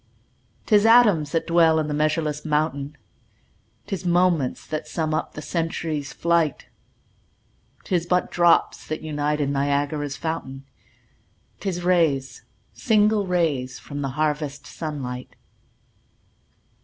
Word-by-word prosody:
'Tis 210 -2 +4
atoms 215 -10 +5
that 165 - 0
dwell 165 -2 +4
in 155 - -1
the 150 - -2
measureless 150 0 0
mountain, 150 -2 -1 0.9
'Tis 195 -1 -4
moments 175 -6 +1
that 155 0 -4
sum 155 0 -2
up 155 - -2
the 155 - -6
century's 160 -4 -3
flight; 165 +1 0 1.1
'Tis 175 -2 -1
but 180 0 +1
drops 175 -1 +2
that 155 - -4
unite 150 -1 -1
in 140 -1 0
Niagara's 145 +1 -1
fountain, 135 -5 -5 0.9
'Tis 180 -3 -3
rays, 160 -7 +1 0.3
single 210 -3 +2
rays, 155 -8 0
from 145 0 -7
the 135 - -2
harvest 150 -2 -1
sun 150 -4 -5
light. 125 0 -7
155 Hz, 120 wpm, -23 LUFS, 145-170 Hz, 1.1 s, atoms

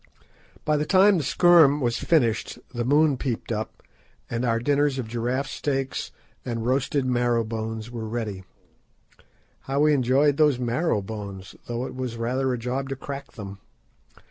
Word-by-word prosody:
By 150 0 +2
the 150 - 0
time 195 0 +5
the - - -2
"scherm" 155 -1 +5
was 120 -4 0
finished 120 -9 +1 0.2
the 120 -1 -2
moon 145 +2 +3
peeped 120 -3 -3
up, 110 0 -4 0.5
and 115 +1 -1
our 115 -2 +2
dinners 145 +3 +1
of 125 -4 -3
giraffe 120 +4 -1
steaks 135 -1 -3 0.3
and 115 -2 -3
roasted 135 +2 +1
marrow 120 -2 +1
bones 110 0 -5
were 115 -2 -5
ready. 110 -4 -4 1.3
How 140 +1 +1
we 150 0 +5
enjoyed 140 +2 +3
those 150 -4 +4
marrow 125 - 0
bones, 100 -2 -7
though 120 +1 -3
it - - -7
was 130 -3 -4
rather 130 +3 0
a 125 - -1
job 130 +3 -3
to 135 - -2
crack 140 +1 -7
them! 100 -3 -8
125 Hz, 160 wpm, -25 LUFS, 115-140 Hz, 1.3 s, time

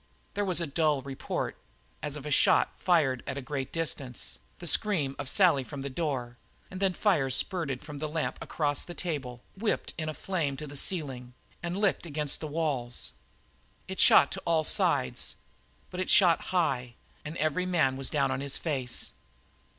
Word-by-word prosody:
There 205 - 0
was 185 -3 +2
a 170 - 0
dull 150 -2 +1
report, 135 -1 -3 0.5
as 145 -1 -2
of 150 -1 -7
a 150 - -4
shot - - +4
fired 150 -8 +3
at 135 - -3
a - - -1
great 135 0 -4
distance, 140 - -3 0.2
the - - -9
scream 155 -10 +2
of 140 -2 -2
Sally 170 -8 +4
from 140 +1 -7
the 140 - -4
door, 130 -5 -2 0.3
and 185 - -6
then 190 -1 +2
liquid - - -16
fire 165 -11 +3
spurted 140 -1 +2
from 150 -2 -8
the 155 - -2
lamp 155 +1 -2
across 145 -3 -1
the 175 - -8
table, 140 -8 -4
whipped 210 +3 -1
in 155 -1 -2
a 155 - -5
flare 165 -8 -1
to 150 - -6
the 145 0 -9
ceiling, 135 -7 -2 0.3
and 175 +2 -3
licked 200 -4 +1
against 150 -2 -1
the 155 - -4
walls. 145 -6 -1 0.8
It - - -6
shot - - +7
to - - -4
all 165 -2 +2
sides - - +2 0.6
but 180 - -5
it 185 - -1
shot 175 -4 +5
high, 130 -10 0 0.3
and 155 +3 -6
every 155 +4 0
man 155 -8 +2
was 135 0 -1
down 145 -3 +1
on 130 +1 -2
his 140 -1 -2
face. 130 -7 -2
150 Hz, 185 wpm, -29 LUFS, 135-170 Hz, 0.8 s, shot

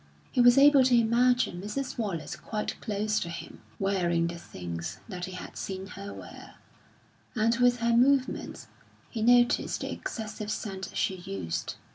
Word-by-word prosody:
He 250 - +3
was 245 +1 +7
able 280 -1 +7
to 250 -1 +5
imagine 235 -4 +2
Mrs. 255 +7 -4
Wallace 195 -8 -3
quite 210 -1 -4
close 215 0 0
to 170 - -4
him, 165 -1 -8 0.2
wearing 175 -4 +1
the 170 0 -4
things 85 - -6
that 180 -5 -5
he 185 - -8
had 185 - -8
seen 190 0 -5
her 200 +1 -8
wear, - - -11 0.8
and 230 +1 +2
with 245 -1 +3
her 235 0 +3
movements 260 +2 +2 0.5
he 225 - -4
noticed 240 +1 +3
the - - -3
excessive 215 -2 -5
scent 195 -3 -4
she 190 - 0
used. 175 - -4
210 Hz, 155 wpm, -28 LUFS, 185-245 Hz, 0.8 s, was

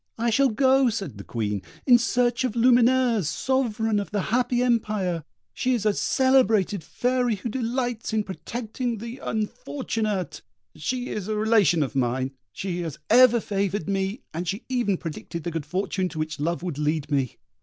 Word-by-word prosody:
"I 230 +1 +1
shall 275 +4 +4
go," 260 +2 +4
said 195 - -4
the - - -7
Queen, 105 -3 -2 0.2
"in 245 -2 +7
search 240 +1 +1
of 245 -3 -1
Lumineuse, 240 - +4
Sovereign 225 -4 0
of 200 - -4
the 205 - -1
Happy 245 0 +2
Empire; 210 -8 0 0.3
she 255 0 +1
is 220 -3 -3
a 210 - +4
celebrated 220 - +2
fairy 245 +5 0
who 205 +4 -5
delights 245 -1 -2
in 220 -1 +1
protecting 225 - -4
the 235 +4 -7
unfortunate. 210 - -3 0.3
She 255 -1 -3
is 210 -2 -4
a 215 - -1
relation 210 -7 +3
of 135 - -5
mine; 130 +1 0 0.2
she 180 - -4
has 160 -4 -5
ever 240 0 +7
favoured 200 -4 -2
me, 195 +3 -2
and 175 +3 -4
she 200 +7 -3
even 240 -7 +1
predicted 165 0 -6
the 170 - -3
good 160 -3 -4
fortune 185 +2 -1
to 165 - -9
which 155 -1 -3
love 170 +3 -1
would 170 -5 -4
lead 150 -1 -1
me." 135 -4 0
210 Hz, 170 wpm, -25 LUFS, 170-245 Hz, 0.3 s, in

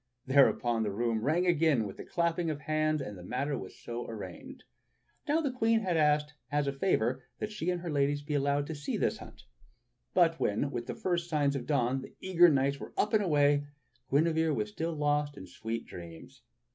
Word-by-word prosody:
Thereupon 125 -3 +3
the 110 - 0
room 115 +1 0
rang 160 +9 +1
again 160 -9 +3
with 100 - -7
the - - -7
clapping 170 0 0
of 150 -1 -4
hands, 155 0 0
and 105 -6 -6
the 90 - -10
matter 135 +9 -2
was 95 - -8
so 120 0 -6
arranged. 265 - -8 0.6
Now 305 +3 +2
the 285 -4 -1
Queen 225 -2 +2
had 185 -4 0
asked 150 -1 +2 0.2
as 145 0 +1
a 140 - -1
favor 130 -5 +1 0.2
that 215 - -4
she 180 -5 -3
and 180 -1 -1
her 170 -2 -4
ladies 145 0 +1
be 150 - -4
allowed 140 0 +1
to 160 - -5
see 145 -2 -3
this - - 0
hunt; - - -12 0.7
but 165 -2 +4
when, 110 +7 0
with 120 -3 -4
the 120 - -4
first 175 +4 -1
signs 145 -3 +1
of 125 -3 -4
dawn, 130 -2 +1
the - - -12
eager 175 -2 +5
knights 140 -1 +1
were - - -9
up 210 - +1
and 215 -1 +4
away, 145 -4 +3 0.4
Guinevere 160 +1 +2
was 105 -1 -2
still 165 +8 -3
lost 145 -1 0
in - - -8
sweet 110 +5 -5
dreams. 85 +11 -11
145 Hz, 205 wpm, -31 LUFS, 130-165 Hz, 0.7 s, eager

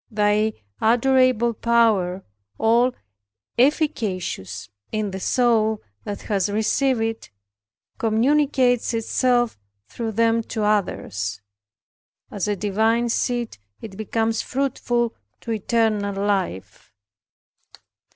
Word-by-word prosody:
Thy 210 0 +2 0.3
adorable 245 0 +3
power, 215 -6 +2 0.3
all 235 +3 +3 0.6
efficacious 205 - 0 0.2
in 215 -2 -2
the 190 - -5
soul 220 -1 +2 0.2
that 205 -1 -5
has 200 -2 0
received 225 +4 +1
it, 225 0 -3 0.7
communicates 245 +1 +2
itself 240 - +1 0.3
through 225 -2 -4
them 230 +1 +2
to 220 -1 -4
others. 105 - -1 0.9
As 205 -1 -2
a 205 - 0
divine 220 +4 +1
seed 240 - -1 0.2
it 210 -4 -9
becomes 225 +2 -1
fruitful 245 -3 -1 0.3
to 230 - -5
eternal 215 -2 0
life. 190 - -3
225 Hz, 95 wpm, -23 LUFS, 205-240 Hz, 0.9 s, adorable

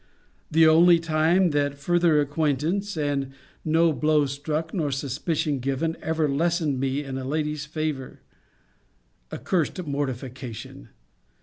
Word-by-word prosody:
the 160 +1 +5
only 170 +2 +6
time 165 +2 +2
that 145 -1 0
further 170 +1 +2
acquaintance, 155 +7 -1
and 140 -3 -1 0.3
no 165 +1 +3
blow 150 0 +2
struck, 150 +4 -3
nor 160 -6 -1
suspicion 145 +2 -2
given, 135 +6 -1
ever 160 -1 0
lessened 155 -1 0
me 135 +2 -1
in 135 -1 -5
a - - -5
lady's 150 +1 -2
favour! 155 -4 -4 1.1
A - - -5
cursed 180 0 -1
mortification! 130 - -5
150 Hz, 120 wpm, -25 LUFS, 140-165 Hz, 1.1 s, only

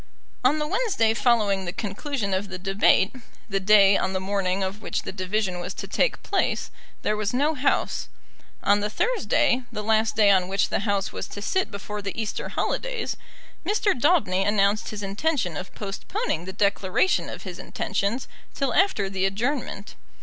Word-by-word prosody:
On 270 +5 +4
the 300 - -1
Wednesday 370 - +1
following 210 -5 +2
the 175 - -2
conclusion 210 +2 -3
of 195 +2 -1
the 185 - -5
debate, 195 +1 +3 0.3
the 195 -3 0
day 200 0 +6
on 190 - 0
the 185 - 0
morning 190 0 0
of 195 +3 -4
which - - -2
the - - -5
division 190 -1 -1
was 175 - -5
to - - -6
take - - 0
place, 395 - 0 0.3
there 215 - +1
was 215 +2 -1
no 295 +5 +2
House. 285 -1 0 0.6
On 205 +1 +4
the 210 +1 -1
Thursday, 260 - +1
the 210 -2 -4
last 220 0 +2
day 210 -2 +6
on 185 -2 +3
which 195 +1 +1
the - - 0
House 200 -1 0
was - - -4
to - - -8
sit 375 - 0
before 205 +1 -6
the 200 +2 -5
Easter 220 -2 -3
holidays, - - -2 0.5
Mr. 405 +2 +2
Daubeny 255 - +2
announced 205 +1 +2
his 210 -1 -5
intention 200 - -1
of 180 +5 -6
postponing 195 -4 -3
the 190 - -5
declaration 200 - +1
of - - -8
his 180 -2 -7
intentions 200 +5 -2 0.3
till 275 -4 0
after 370 - +3
the 190 0 0
adjournment. 215 0 -3
205 Hz, 175 wpm, -25 LUFS, 195-245 Hz, 0.6 s, day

